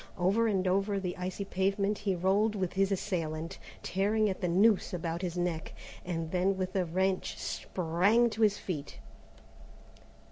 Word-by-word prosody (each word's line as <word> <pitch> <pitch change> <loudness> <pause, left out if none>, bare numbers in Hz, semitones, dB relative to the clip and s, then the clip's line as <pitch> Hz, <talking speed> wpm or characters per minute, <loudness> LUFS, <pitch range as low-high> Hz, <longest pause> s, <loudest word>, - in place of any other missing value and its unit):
Over 195 +6 +2
and 190 -3 +1
over 195 +2 +1
the 180 -2 -3
icy 185 +2 -4
pavement 195 +2 0
he 200 -2 0
rolled 200 +5 +2
with 185 -3 -2
his 195 +1 +2
assailant, 165 -5 -2 0.2
tearing 205 +3 +1
at 190 - -6
the 180 - +1
noose 195 +2 +3
about 170 0 -3
his 180 -2 -3
neck, 175 -2 -2 0.3
and 165 -2 -3
then 190 +1 +1
with 185 0 -3
a 185 -2 +2
wrench 185 +3 0
sprang 185 +7 +1
to 220 - -4
his 205 -2 +4
feet. 150 -6 -5
190 Hz, 155 wpm, -31 LUFS, 175-200 Hz, 0.3 s, his